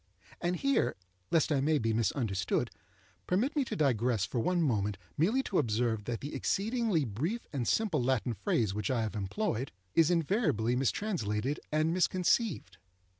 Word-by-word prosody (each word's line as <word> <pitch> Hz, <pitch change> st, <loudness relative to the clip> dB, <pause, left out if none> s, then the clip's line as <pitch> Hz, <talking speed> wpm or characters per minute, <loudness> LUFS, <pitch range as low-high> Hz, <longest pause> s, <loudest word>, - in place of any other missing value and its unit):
And 175 Hz, +1 st, 0 dB
here, 275 Hz, +8 st, +1 dB, 0.3 s
lest 160 Hz, -1 st, +2 dB
I 140 Hz, -3 st, +2 dB
may 155 Hz, +2 st, +3 dB
be 115 Hz, -4 st, 0 dB
misunderstood, 110 Hz, -, 0 dB, 0.6 s
permit 225 Hz, -, +1 dB
me 290 Hz, -, +3 dB
to -, -, -4 dB
digress 125 Hz, -, +1 dB
for 120 Hz, -, -3 dB
one 180 Hz, +9 st, +1 dB
moment 105 Hz, -8 st, 0 dB, 0.2 s
merely 220 Hz, -, +2 dB
to 195 Hz, -, 0 dB
observe 115 Hz, -4 st, 0 dB
that 120 Hz, 0 st, -3 dB
the 145 Hz, -, -6 dB
exceedingly 215 Hz, -, 0 dB
brief 155 Hz, -, -2 dB
and 130 Hz, -4 st, -2 dB
simple 205 Hz, -, +1 dB
Latin 125 Hz, -1 st, +1 dB
phrase 105 Hz, 0 st, 0 dB
which 105 Hz, 0 st, -2 dB
I 120 Hz, -3 st, +1 dB
have 110 Hz, 0 st, -4 dB
employed, 120 Hz, -, -2 dB, 0.2 s
is 165 Hz, -1 st, +5 dB
invariably 155 Hz, -, +1 dB
mistranslated 135 Hz, -, -1 dB
and 155 Hz, +2 st, +2 dB
misconceived. 180 Hz, -, +1 dB
140 Hz, 155 wpm, -31 LUFS, 110-180 Hz, 0.6 s, is